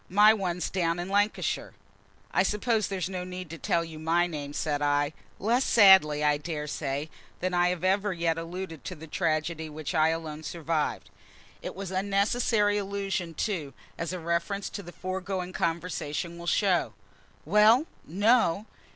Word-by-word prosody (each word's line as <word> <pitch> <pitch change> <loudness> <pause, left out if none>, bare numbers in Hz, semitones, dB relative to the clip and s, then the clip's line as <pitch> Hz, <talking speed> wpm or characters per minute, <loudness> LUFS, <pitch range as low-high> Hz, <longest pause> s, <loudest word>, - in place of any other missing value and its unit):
My 210 +3 +7
one's 180 -4 -2
down 170 -2 0
in 175 +2 -4
Lancashire." 205 +2 0 0.6
"I - - +3
suppose 210 +1 +1
there's 190 -4 -2
no 185 -1 -4
need 180 -2 -7
to 165 - -7
tell 170 +3 +1
my 165 +2 0
name?" 150 -4 -5
said 145 0 -2
I, 145 +1 +1 0.2
less 235 +5 +2
sadly, 190 - +6
I 150 -1 +3
daresay, 150 -2 -3 0.3
than 185 0 -1
I 175 0 +3
had 180 -1 -3
ever 195 +2 +2
yet 170 -2 0
alluded 165 -2 -6
to 185 - -6
the 160 0 -10
tragedy 160 -1 -1
which 155 +3 -5
I 160 -1 +4
alone 160 -2 -4
survived. 160 -1 -2 0.5
It - - -6
was 195 -1 -6
an 185 - -1
unnecessary 205 +1 +2
allusion, 195 -4 -3
too, 165 -10 -2 0.2
as 165 0 -3
a 185 - -3
reference 170 +4 -2
to 200 - -5
the 175 -2 -10
foregoing 185 +1 -4
conversation 170 -2 -2
will 170 - -8
show. 180 - +2 0.5
"Well, 215 - +5 0.2
no!" 205 +1 +3
175 Hz, 160 wpm, -28 LUFS, 160-195 Hz, 0.6 s, My